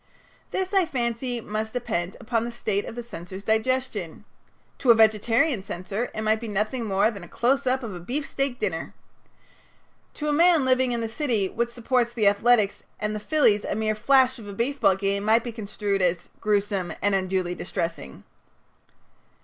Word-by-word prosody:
This, 380 +1 -2
I 380 -4 +4
fancy, 240 -2 -2
must 215 +1 -4
depend 205 -8 -2
upon 230 -1 -1
the 235 - -3
state 215 -4 -2
of - - -7
the 240 - -5
censor's 190 -3 -9
digestion. 220 -5 -1 0.5
To 255 - 0
a 235 - +9
vegetarian 225 +4 +3
censor 195 +5 -4
it 215 - -2
might 220 0 +2
be 230 - -6
nothing 215 +4 -1
more 205 +2 +2
than 200 -5 -9
a - - -10
close 265 +8 +1
up 260 +1 +1
of 220 -4 -5
a 175 - -7
beefsteak 275 - -2
dinner. - - -3 1.2
To 300 - -4
a 295 - +2
man 330 -2 +5
living 255 -1 +3
in 235 -1 -1
the 225 - -1
city 225 -5 0
which 235 +1 -1
supports 240 0 0
the 225 -3 0
Athletics 205 0 +3 0.2
and 210 0 -2
the - - -3
Phillies 210 -4 +3
a - - -2
mere 215 0 0
flash 260 +3 +3
of 210 - -10
a 200 - -7
baseball 235 -2 +2
game 200 +1 -1
might 220 +2 +4
be 240 - -4
construed 205 -2 -2
as 175 -1 0
"gruesome 200 -4 0
and 205 0 +3
unduly 185 -2 0
distressing." 165 - -5
220 Hz, 180 wpm, -25 LUFS, 200-245 Hz, 1.2 s, a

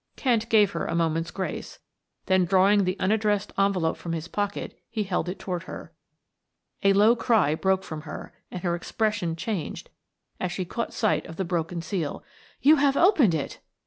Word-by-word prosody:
Kent 230 -4 +1
gave 210 -3 +5
her 170 - -3
a 165 - -2
moment's 165 0 0
grace, 190 - -5 0.5
then 190 -1 +3
drawing 195 +3 +4
out 195 - +2
the 185 +2 -1
unaddressed 210 +1 +1
envelope 195 -5 +1
from 170 - -5
his 165 +1 -4
pocket 205 +1 -3
he 220 -2 -2
held 180 -3 -1
it 180 - -4
toward 180 -1 -4
her. - - -9 0.9
A 195 -1 +4
low 210 +4 +5
cry 220 - +2
broke 190 +3 +1
from 155 -4 -6
her, 150 -1 -8 0.2
and 180 - -7
her 175 -2 +1
expression 180 -1 -1
changed 185 0 -4 0.5
as 180 - -2
she 185 +1 -3
caught 230 +6 -3
sight 215 - 0
of 165 - -9
the 190 - -2
broken 170 0 -2
seal. 170 -6 -3 0.4
"You 305 +3 +7
have 280 -1 +3
opened 305 - +5
it!" 150 - -4
190 Hz, 180 wpm, -26 LUFS, 170-210 Hz, 0.9 s, You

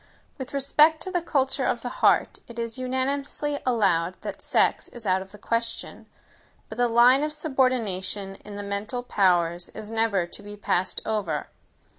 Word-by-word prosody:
With 260 - -6
respect 295 +3 +4
to 375 - -5
the 355 -2 0
culture 270 -4 0
of 240 -1 -1
the 245 - -3
heart, - - +3
it 235 - -12
is 230 +1 -3
unanimously 275 +3 -2
allowed 185 -7 +2
that - - -6
sex - - +1
is 240 -2 -11
out 190 -1 +2
of 190 0 -10
the 210 - -12
question; 230 +2 -3 0.6
but 220 - -8
the 245 - +4
line 240 +3 +6
of 300 0 -1
subordination 230 - -1
in 205 - -11
the 205 - -5
mental 200 +5 -3
powers 175 -6 +2
is 215 0 -7
never 225 -5 +1
to 175 - -11
be 205 0 -10
passed 185 -2 0
over. 195 -9 -2
230 Hz, 170 wpm, -26 LUFS, 200-260 Hz, 0.6 s, line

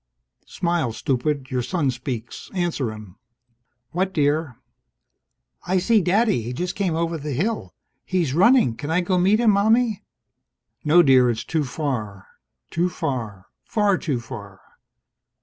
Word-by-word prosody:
Smile, 170 -9 -1
stupid. 135 +2 -2
Your 125 -1 0
son 145 0 0
speaks. 125 -2 -6
Answer 170 -10 -1
him. 105 -3 -11 0.7
"What, 190 +2 -1
dear?" 145 -4 0 1.1
"I 185 +1 +2
see 215 +4 +3
Daddy! 200 - +2
He 120 +3 -5
just 180 +7 -3
came 185 -6 -1
over 165 0 -1
the 150 0 -4
hill. 205 - -2 0.3
He's 175 -8 -1
running! 190 - +4
Can 145 +5 -6
I 165 +3 +2
go 180 0 +1
meet 195 +5 +3
him, 235 -3 +5
Mommie?" 220 +1 +2 0.8
"No, 165 +4 +6
dear. 130 -4 +5
It's 115 -1 -2
too 160 -2 -1
far." 125 -9 -4 0.5
Too 175 +2 +1
far. 115 - -4 0.2
Far 205 -3 +1
too 140 -6 -2
far. 100 -6 -10
155 Hz, 140 wpm, -23 LUFS, 125-185 Hz, 1.1 s, No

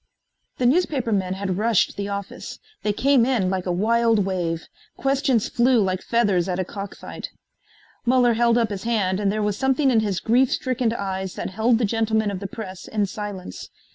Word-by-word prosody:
The 250 - 0
newspapermen 240 - +1
had 190 -1 -2
rushed 225 -2 +2
the 200 0 -3
office. 200 -1 -6 0.2
They 210 - 0
came 265 +3 +3
in 230 -7 +1
like 185 -1 -2
a - - +1
wild 225 +2 +2
wave. 170 -4 -2 0.3
Questions 270 -4 +1
flew 245 0 +3
like 185 -2 0
feathers 200 -6 +1
at 180 - -1
a 185 - -1
cock 200 +2 -7
fight. - - -8 0.7
Muller 245 -1 +4
held 235 +1 +3
up 230 -3 +1
his 195 -2 -4
hand 205 -5 0
and 200 -1 +1
there 215 0 -1
was 205 -1 -1
something 265 +1 +2
in 230 - +4
his 205 -4 -1
grief 245 +3 +3
stricken 255 -2 0
eyes 190 -4 -3
that - - -4
held 225 +4 +2
the 230 - +1
gentlemen 220 -1 0
of 190 - -4
the 200 - -5
press 190 -3 -8
in 210 -2 0
silence. 200 - -7
215 Hz, 190 wpm, -23 LUFS, 190-235 Hz, 0.7 s, Muller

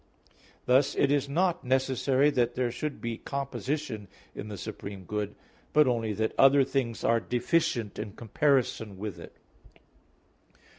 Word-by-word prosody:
Thus 130 +2 +3
it 140 - +3
is 145 -1 +1
not 175 +3 +1
necessary 130 +2 +2
that 120 -3 +1
there 125 -2 0
should 150 +4 -4
be 115 -1 -4
composition 140 -4 -3 0.3
in 105 - -7
the 105 -1 -6
supreme 100 -2 -7
good, 105 +2 -3 0.4
but 150 0 +6
only 115 -4 0
that 110 +2 -1
other 135 +1 +7
things 130 -4 -2
are 115 0 +3
deficient 125 - 0
in 105 -2 -5
comparison 120 -4 0
with 105 -2 -5
it. - - -11
125 Hz, 140 wpm, -28 LUFS, 110-140 Hz, 0.4 s, other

